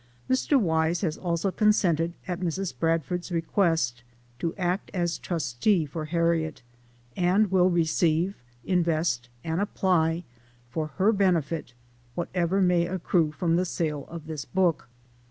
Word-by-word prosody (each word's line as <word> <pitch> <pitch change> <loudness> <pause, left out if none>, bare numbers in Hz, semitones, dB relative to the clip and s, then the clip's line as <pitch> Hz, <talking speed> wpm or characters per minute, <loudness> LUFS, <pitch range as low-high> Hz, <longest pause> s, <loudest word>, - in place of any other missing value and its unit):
Mr. 265 +2 +3
Wise 160 -3 +1
has 160 -5 0
also 175 +2 -1
consented, 175 -6 +2
at 180 -1 -3
Mrs. 180 -2 -2
Bradford's 165 +4 -1
request, 165 -7 +1 0.4
to 165 +3 -2
act 180 0 -1
as 175 -2 -1
trustee 165 - 0
for 155 +2 -5
Harriet; 165 -2 0 0.5
and 185 +3 +2
will 185 -1 +4
receive, 170 +2 +1 0.3
invest, 165 -8 0
and 165 +3 -1
apply, 175 -4 +1 0.5
for 155 +4 -2
her 200 +4 +4
benefit, 165 - 0 0.4
whatever 180 +2 0
may 175 -1 +3
accrue 175 -3 +1
from 165 +2 0
the 180 - +2
sale 155 -5 -2
of 165 -2 -8
this 155 -3 -5
book. 175 -4 0
170 Hz, 130 wpm, -27 LUFS, 160-185 Hz, 0.5 s, will